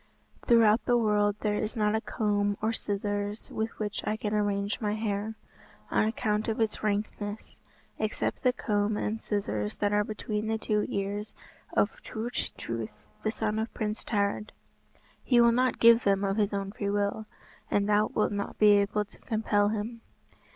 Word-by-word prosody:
"Throughout 230 -2 +5
the 245 - +4
world 210 -2 +2
there 210 -1 0
is 215 +2 -3
not 210 -2 +2
a 220 - +1
comb 205 -2 0
or 220 +2 0
scissors 205 0 -3
with 220 +1 -3
which 210 -1 -3
I 215 - -1
can 210 -1 -2
arrange 205 0 0
my 210 -1 0
hair, 215 0 -2 0.6
on - - +3
account 215 -1 0
of 225 0 -1
its 220 -1 0
rankness, 205 0 -3 0.4
except 215 0 -1
the 250 - +4
comb 210 -3 0
and 220 +1 -2
scissors 105 - -2
that 205 0 +1
are 210 0 +3
between 215 0 -3
the 220 0 0
two 210 -1 0
ears 200 +2 -2 0.4
of - - +1
Turch 230 +3 -3
Truith, 110 -2 -5 0.2
the 215 - 0
son 215 -1 -1
of 220 +1 -2
Prince 215 -1 -2
Tared. 205 0 -1 0.7
He 245 -2 +4
will 235 0 +7
not 255 +2 +2
give 235 0 +7
them 195 0 +2
of 195 +1 0
his 210 -2 +2
own 195 -1 -2
free 200 -1 -3
will, 205 +1 -1 0.4
and 200 0 +2
thou 210 0 +4
wilt 210 - 0
not 200 0 -3
be 210 -1 +6
able 210 +1 0
to - - -19
compel 210 -2 +1
him." 220 +2 -4
210 Hz, 175 wpm, -29 LUFS, 205-220 Hz, 0.7 s, will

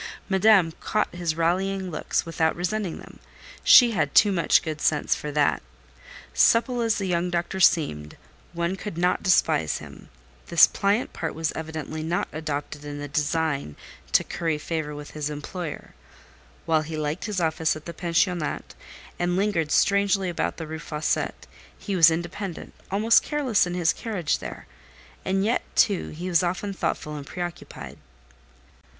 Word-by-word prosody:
Madame 190 -3 +4
caught 215 - -1
his 175 -3 -2
rallying 185 +3 0
looks 155 - -1
without 165 -1 0
resenting 185 0 -2
them—she 245 -2 +3
had 155 -9 -1
too 205 - +6
much 170 -5 +3
good 155 -2 -5
sense 150 -2 +2
for 150 - -5
that. 145 -1 +2 0.7
Supple 240 +1 +3
as 225 -1 +2
the 200 - -2
young 180 -1 0
doctor 175 +2 -2
seemed, 110 - +2 0.4
one 170 +2 -1
could 200 -4 -7
not 180 +1 +1
despise 130 - +2
him—this 60 - +1
pliant 205 +5 0
part 160 - -4
was 160 -1 -1
evidently 160 0 -5
not 170 +3 -1
adopted 150 -1 -4
in 145 0 -6
the 145 0 -5
design 145 - -1 0.4
to - - +4
curry 165 -3 -2
favour 150 -1 -4
with 145 0 -9
his 150 -1 -3
employer: 150 +2 -6 0.7
while 160 -2 +2
he 155 +1 -6
liked 150 +2 -3
his 210 -4 -2
office 160 -1 +1
at 155 - -10
the 170 - -6
pensionnat, 175 -2 -1 0.5
and 175 0 0
lingered 180 -6 0
strangely 200 -1 +2
about 175 - -2
the 165 - -5
Rue 160 +1 -6
Fossette, 150 -1 -2 0.3
he 200 - -4
was 165 -3 +8
independent, 170 +2 -5 0.2
almost 215 +4 +4
careless 265 - +1
in 175 - -4
his 170 -3 +2
carriage 200 -9 -2
there; - - -8 0.6
and 195 +1 0
yet, 230 +3 +1
too, 200 -4 +2
he 170 +4 -6
was 175 -3 +3
often 185 +3 -2
thoughtful 150 -5 -3
and 145 -1 -8
preoccupied. 175 -1 -7
170 Hz, 155 wpm, -25 LUFS, 155-190 Hz, 0.7 s, was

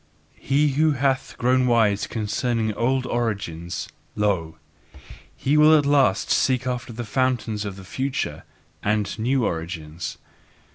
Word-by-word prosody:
He 145 +2 +2
who 150 +3 +2
hath 135 0 0
grown 125 +1 +2
wise 110 -4 +2
concerning 110 +1 -1
old 130 +4 0
origins, 100 -9 -3 0.3
lo, 95 -6 0 0.8
he 145 +3 +1
will 155 +1 +7
at 145 - +1
last 135 -9 +3
seek 130 -1 +2
after 125 -1 -3
the 120 +1 -6
fountains 115 -3 -1
of 100 -2 -5
the 95 - -11
future 130 +6 -3 0.4
and 105 +1 -1
new 125 +2 +1
origins. 80 -1 -4
120 Hz, 130 wpm, -23 LUFS, 100-130 Hz, 0.8 s, will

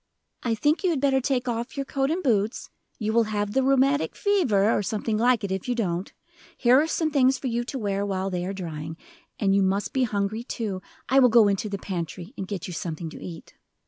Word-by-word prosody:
"I 230 -2 0
think 295 - +1
you 370 - +3
had 320 -5 +1
better 265 -1 +2
take 255 -1 0
off 240 +3 -3
your 275 - -1
coat 270 0 0
and 350 +4 -1
boots 220 -4 0 0.3
you 220 -1 -1
will 230 0 +4
have 205 -1 -2
the 265 - +3
rheumatic 275 +2 +2
fever, 255 - +2
or - - +1
something 215 +2 -2
like 240 +1 +3
it, 200 - -2
if 190 +5 -3
you 245 - +1
don't. 185 -4 -2 0.5
Here 255 +2 +5
are 315 - 0
some 320 -1 0
things 265 -2 +4
for - - -9
you 240 -1 0
to 265 - -5
wear 200 -4 -1
while 195 -1 -2
they 180 -1 -2
are - - -2
drying. 160 -4 -6 0.4
And 195 -3 +2
you 200 - +4
must 195 +1 0
be 260 -1 +2
hungry, 210 +1 -2
too; 215 -6 -4 0.3
I 270 - +5
will 250 -2 +6
go 225 -2 +6
into 200 +1 0
the 200 - -3
pantry 180 - -5
and 190 - -5
get 195 -4 -4
you 180 - -6
something 165 -1 -4
to - - -10
eat." 170 -3 -9
220 Hz, 235 wpm, -25 LUFS, 195-260 Hz, 0.5 s, will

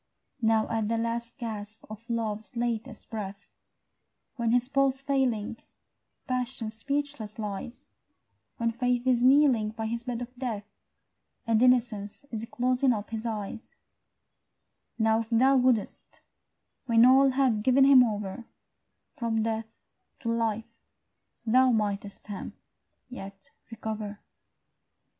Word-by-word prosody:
Now 220 -1 +3
at 225 -2 0
the 230 +1 0
last 230 +1 -3
gasp 220 -2 -5
of 215 +3 -11
love's 220 0 -3
latest 235 0 -3
breath, 200 -2 -6 0.8
When, 235 -2 0
his 245 +1 +3
pulse 275 0 +1
failing, 250 -6 0 0.7
passion 250 -3 -2
speechless 275 -2 -3
lies, 210 +3 -5 0.7
When 230 0 0
faith 245 +1 0
is 250 -2 +3
kneeling 260 -5 +5
by 225 0 -4
his 230 +1 -3
bed 245 -1 -3
of 245 +1 -11
death, 235 -5 -4 0.8
And 225 -1 +2
innocence 240 -2 +2
is 225 -1 -3
closing 255 +1 +2
up 210 -1 -5
his 225 +1 -3
eyes, 220 0 -5 1.2
Now 220 -1 +3
if 225 -1 -5
thou 260 +4 +4
wouldst, 250 -4 0 0.7
when 230 0 +6
all 265 +2 +6
have 260 -5 +2
given 260 +4 +4
him 270 -2 +8
over, 210 0 -3 0.7
From 225 -2 0
death 225 0 -4 0.4
to 230 - -2
life, 225 -1 -2 0.6
thou 255 +3 +5
mightst 205 -2 -2
him 205 -2 -6 0.5
yet 195 -6 -10 0.2
recover. 215 -2 -5
230 Hz, 120 wpm, -28 LUFS, 220-250 Hz, 1.2 s, him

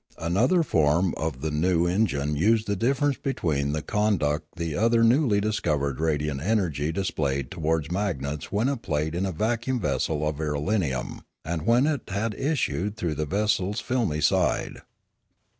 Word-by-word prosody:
Another* 115 - +2
form 85 - +2
of 80 -5 -3
the 80 +1 -2
new 85 +3 +2
en 95 +6 +2
gine 70 -2 -2
used 110 +8 +2
the 100 - -1
difference 135 +5 +1
between 75 - -1
the 75 +1 -2
conduct 80 -9 0
the 80 -3 -3
other 115 +3 +3
newly 115 -2 +4
discovered 75 -10 -1
radiant 75 -3 -1
energy 80 -6 0
displayed 70 -8 -2
towards 80 -1 -1
magnets 75 -7 -3
when 105 +5 +1
it 135 -4 -2
played 75 -2 -1
in 90 +3 -1
a - - -2
vacuum 115 +7 -1
vessel 75 -5 -1
of 75 -1 -2
irelium, 75 -1 -1 0.2
and 80 0 -3
when 120 +4 +4
it 150 -2 0
had 105 +3 -1
issued 110 - -1
through 85 -3 -1
the 75 0 -3
vessel's 100 +2 0
filmy 115 -12 -1
side. - - +1
85 Hz, 160 wpm, -26 LUFS, 75-110 Hz, 0.2 s, newly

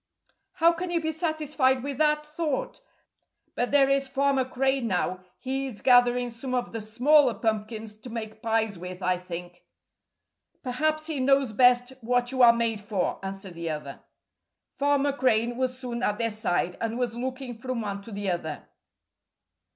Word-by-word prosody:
"How 335 -2 +5
can 345 +2 -4
you 345 -1 +1
be 315 -1 -1
satisfied 300 -5 0
with 280 0 -4
that 300 -1 +2
thought? 330 - -3 0.7
But 245 - -1
there 280 -1 +5
is 275 0 +2
Farmer 275 0 +2
Crane 265 -1 0
now. 185 -2 0 0.2
He 270 +1 -3
is 230 -6 -9
gathering 245 -1 +4
some 255 +3 -4
of 245 - -2
the 225 - -4
smaller 250 +5 +4
pumpkins 220 -1 -3
to 225 +4 -11
make 220 -2 -6
pies 220 -4 0
with, 180 +1 -7
I 180 0 +2
think." 175 0 -8 1.0
"Perhaps 310 +4 0
he 310 -3 -3
knows 270 -2 +3
best 245 +2 +4
what 245 +1 +1
you 260 -1 0
are 240 -1 +9
made 230 -2 -1
for," 200 -3 -2
answered 195 -1 -6
the 170 -1 -4
other. 150 -3 -5 0.7
Farmer 285 0 +1
Crane 240 -3 +1
was 255 0 -1
soon 245 -2 -5
at 210 -3 0
their 230 0 0
side, 180 -4 -1
and 230 0 -2
was 245 -2 -1
looking 255 0 -4
from 255 -1 -3
one 200 -2 -4
to 225 - -11
the 200 -2 -2
other. 160 -4 -4
245 Hz, 165 wpm, -27 LUFS, 215-275 Hz, 1.0 s, are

